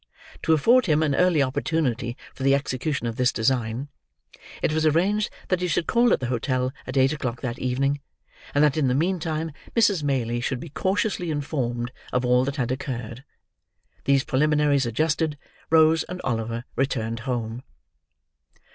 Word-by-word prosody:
To 160 - +3
afford 230 - +4
him 155 -1 +3
an 145 -2 +1
early 175 -2 +3
opportunity 130 -3 -1 0.2
for - - -13
the 135 +1 +4
execution 140 -1 -2
of 115 -1 -3
this 125 0 +3
design, 120 +2 0 0.8
it - - +2
was 155 0 +1
arranged 185 +7 +2 0.2
that 185 -1 +1
he 180 - 0
should 165 0 0
call 235 -1 +3
at - - +3
the 130 - -3
hotel 130 +1 -1
at 130 +2 -3
eight 135 +2 +4
o'clock 125 -5 -4
that 125 -2 -4
evening, 135 +3 0 0.5
and 145 - +5
that 150 0 +3
in 145 -4 +2
the 125 - +2
meantime 160 -1 -1 0.2
Mrs. 205 -7 +3
Maylie 120 -5 -1
should 125 +1 -2
be 165 - -8
cautiously 190 +2 -1
informed 125 -5 -2 0.2
of 125 0 0
all 125 +1 +4
that 140 +1 -3
had 125 -4 -1
occurred. 125 -2 -5 0.8
These 140 -1 +3
preliminaries 145 -1 +2
adjusted, 155 +4 0 0.3
Rose 160 0 +5
and 180 0 -7
Oliver 115 0 -2
returned 115 -4 -1
home. 120 -1 -3
140 Hz, 165 wpm, -24 LUFS, 125-160 Hz, 0.8 s, and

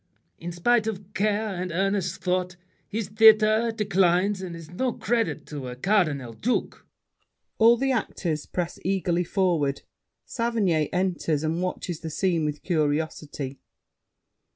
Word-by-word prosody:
In 175 +1 -5
spite 220 +6 +2
of 205 -2 -5
care 210 +2 0
And 180 -1 -3
earnest 190 0 -1
thought, 180 0 0 0.3
his 210 -1 -3
theater 220 +1 +5
declines, 195 -2 +2
And 180 -3 -6
is 165 -1 -11
no 250 +7 -1
credit 235 -2 -1
to 145 -4 -6
a 125 - -6
cardinal 145 - +1
duke. 245 - -2 0.7
[All 230 +1 +7
the 270 +2 +1
actors 170 - -2
press 175 -1 -3
eagerly 180 -2 0
forward. 170 -7 0 0.4
Saverny 210 - 0
enters, 175 -5 0
and 160 +2 -1
watches 180 -2 -3
the 160 - -6
scene 170 0 0
with 150 0 -4
curiosity. 150 -4 -2
185 Hz, 130 wpm, -25 LUFS, 160-215 Hz, 0.7 s, All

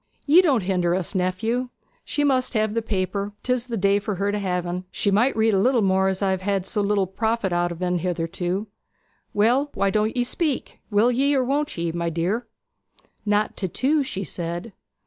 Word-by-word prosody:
'Ye 315 +5 +7
don't 275 - +2
hinder 180 -2 +1
us, 185 0 -1
nephew. 220 +7 -1 0.3
She 290 - -1
must 260 -3 +2
have 215 -1 +1
the 230 - 0
paper: 200 -1 -2
'tis 250 -1 0
the 235 -2 -3
day 200 +1 +3
for 205 0 -3
her 200 +2 0
to 205 - -1
have 180 -3 -1
'n. 180 +1 -4
She 200 - 0
might 225 +6 +2
read 220 0 +3
a 195 - +3
little 240 +2 +3
more, 190 0 +3
as 190 +1 -1
I 195 - +2
have 190 -1 -1
had 195 -1 -1
so 210 +1 -1
little 200 -1 +2
profit 220 0 -1
out 175 0 +1
o' 170 +2 -3
en 180 0 0
hitherto. 175 +3 -2 0.7
Well, 245 +8 +2
why 195 0 +1
don't 215 +3 0
ye 245 - +3
speak? 290 +3 -1
Will 220 +3 +3
ye, 275 +4 +2
or 265 - +2
won't 285 0 -1
ye, 170 0 -1
my 170 0 -2
dear?' 185 +9 -1 0.8
'Not 210 +1 +1
to 190 - -1
two,' 285 - +1
she 200 -8 -3
said. 175 +4 -5
205 Hz, 205 wpm, -24 LUFS, 185-235 Hz, 0.8 s, Ye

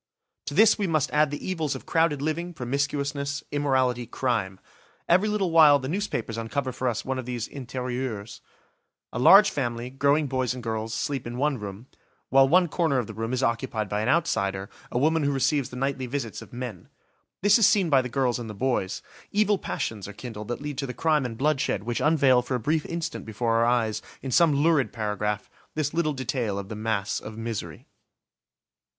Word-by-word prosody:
To - - -4
this 220 0 +6
we 200 - +1
must 155 -4 +1
add 150 0 +3
the 145 - -6
evils 160 -6 -1
of - - -9
crowded 160 -4 +1
living, 170 +3 -2
promiscuousness, 140 +2 -2
immorality, 130 -4 +1
crime. 110 -8 -1 0.5
Every 185 +5 +4
little 200 -4 0
while 155 -3 +7
the 130 -1 -5
newspapers 135 - -2
uncover 130 +4 -2
for 130 +1 -3
us 120 -3 -2
one 130 0 -2
of 125 - -6
these 120 -2 -3
intérieurs: 125 -5 -5 0.7
a - - -3
large 195 +9 +8
family, 120 -2 -3
growing 140 +3 +2
boys 130 -2 -1
and 125 - -8
girls, 110 0 -3
sleep 135 +2 -2
in 120 +1 -5
one 140 -1 0
room; 100 +2 -7 0.4
while 135 0 +6
one 180 +3 +5
corner 160 -3 +1
of 125 - 0
the 110 - -8
room 115 +2 -4
is 130 +1 -1
occupied 115 -3 -1
by 105 +2 -1
an 110 - 0
outsider, 100 - 0 0.2
a - - -1
woman 155 +5 +2
who 145 -1 +1
receives 135 0 +1
the - - -10
nightly 130 0 -2
visits 120 -4 -4
of - - -13
men. 120 -7 -7 0.5
This 205 +3 +6
is 215 - +6
seen 195 -6 +3
by 135 -2 +6
the 125 - -5
girls 125 -1 0
and 115 -2 -6
the 105 - -7
boys; 120 -4 -1 0.3
evil 210 -1 +2
passions 105 -4 -4
are 105 - -8
kindled 105 -4 -8
that 120 +3 -4
lead 145 -2 -5
to 135 - -2
the 125 - -6
crime 155 -5 +2
and 115 -2 -8
bloodshed 140 -7 0
which 120 +1 -2
unveil 140 -5 +4
for 125 +1 -3
a - - -1
brief 155 +7 0
instant 170 -1 -4
before 115 +1 -1
our 115 - +3
eyes, 115 -3 +1 0.2
in 135 - -4
some 165 0 +4
lurid 160 -5 +3
paragraph, 105 -2 -2 0.3
this 150 -2 -1
little 165 -2 +1
detail 125 -6 -2
of 100 0 -6
the 110 - -5
mass 110 -1 -1
of 110 0 -9
misery. 115 -2 -5
130 Hz, 200 wpm, -26 LUFS, 115-150 Hz, 0.7 s, large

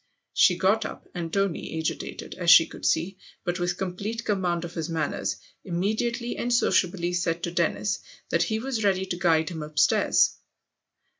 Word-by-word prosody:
She 180 - +5
got 195 +5 +2
up, - - -8
and 170 -2 -4
Tony, 195 -4 -1
agitated, 160 -1 -4
as 175 -2 -1
she 165 -1 +9
could - - -5
see, 185 +4 0 0.2
but 175 0 -2
with 175 0 -1
complete 200 +5 -4
com 200 -2 0
mand 175 -1 0
of 170 - -8
his 165 -1 -4
manners, 160 -3 -1 0.3
immediately 220 +7 -1
and 245 - -2
sociably 185 -6 +2
said 170 -1 -1
to 170 - -2
Dennis 170 +4 0 0.3
that - - +2
he 220 - +1
was 235 -1 -2
ready 190 -2 +2
to 185 - -3
guide 165 -3 +2
him 165 -3 -6
upstairs. 150 0 +3
180 Hz, 170 wpm, -26 LUFS, 170-200 Hz, 0.3 s, she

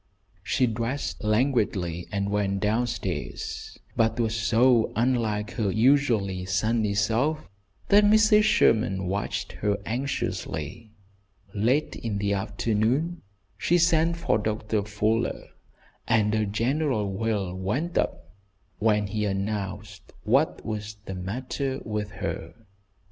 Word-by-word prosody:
She 105 +7 +1
dressed 115 +4 -3
languidly 105 -7 0
and 100 0 -1
went 100 -1 0
down 110 +4 +1
stairs, 115 -2 -5 0.2
but 115 0 +1
was 115 -1 +1
so 115 +1 +3
unlike 110 -3 0
her 110 -4 -1
usually 110 -5 +2
sunny 105 +2 +1
self, 125 +9 +1 0.4
that 205 +1 +7
Mrs. 215 0 +6
Sherman 110 - +3
watched 100 +3 -2
her 105 -1 -1
anxiously. 110 - -3 0.6
Late 125 +9 +1
in 110 -3 -3
the 100 0 0
afternoon 115 - 0 0.4
she 175 - +3
sent 170 0 +3
for 110 -10 +1
Doctor 105 0 -1
Fuller, 105 +2 -1 0.6
and 105 -1 +3
a 110 -1 +1
general 115 -1 0
wail 100 -3 -1
went 120 - -2
up - - -2 0.5
when 105 -1 +2
he 105 +1 -2
announced 100 0 -4
what - - +1
was 105 -1 -5
the 95 - -5
matter 130 +8 -3
with 105 -1 -3
her. - - -5
110 Hz, 115 wpm, -26 LUFS, 100-125 Hz, 0.6 s, that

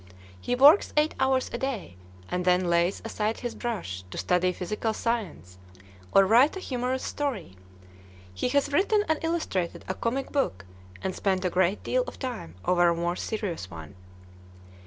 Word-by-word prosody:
He 245 - -1
works 290 +9 +6
eight 300 +1 +3
hours 265 -1 +1
a 235 - -3
day, 250 - -4 0.3
and 180 0 -2
then 180 -1 +2
lays 170 +3 +1
aside 220 0 -2
his 240 -1 -3
brush 175 - -4
to - - -8
study 180 0 +2
physical 210 +5 -3
science, 180 - -3 0.5
or 195 - +6
write 245 - +5
a - - -4
humorous 255 -5 -2
story. 240 - -3 0.8
He 95 - -1
has 285 +1 +1
written 410 +6 +3
and 315 -1 +1
illustrated 320 - -2
a 185 - -1
comic 250 +7 -2
book, 95 - -1 0.4
and 190 -1 -2
spent 190 -2 0
a 180 - +1
great 185 +3 +1
deal - - +1
of - - -8
time 245 - -6
over 175 -1 +4
a 170 - +1
more 170 +1 -1
serious 180 - -4
one. 80 0 -10
210 Hz, 165 wpm, -27 LUFS, 175-265 Hz, 0.8 s, works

